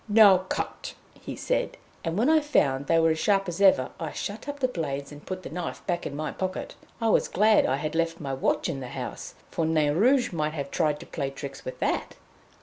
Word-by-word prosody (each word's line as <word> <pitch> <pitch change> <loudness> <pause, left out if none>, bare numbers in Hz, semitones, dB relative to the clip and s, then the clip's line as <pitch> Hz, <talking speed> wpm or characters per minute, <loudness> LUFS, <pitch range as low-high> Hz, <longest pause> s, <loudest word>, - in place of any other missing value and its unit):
"Now 205 -3 +8
cut!" 185 - -4 0.2
he - - -8
said, - - -1 0.3
and 165 +1 -2
when 235 +5 +3
I 315 0 +6
found 140 - +1
they 165 - +4
were 165 0 +4
as 160 - -1
sharp 195 0 +2
as 175 +2 -4
ever, 185 -10 +5
I 160 -2 -3
shut 215 +7 -5
up 285 0 -5
the 260 - +2
blades, 140 - -4
and 145 0 -11
put 185 0 -6
the - - -6
knife 175 0 -5
back 175 -2 -1
into 140 - -6
my 155 -1 -3
pocket. 185 0 -4 0.3
I 225 -1 +1
was - - +3
glad 215 +2 +4
I 130 - +2
had 155 +2 -3
left 165 0 0
my 140 -3 -4
watch 135 - 0
in 135 - -3
the 130 - -6
house, - - -6 0.2
for 165 - -1
Nain 155 -2 +2
Rouge 250 - +3
might 155 -2 -1
have 140 -3 -4
tried 150 -3 +1
to - - -9
play 140 -3 -3
tricks 135 0 -8
with 130 - -6
that. - - -1
165 Hz, 235 wpm, -27 LUFS, 145-200 Hz, 0.3 s, Now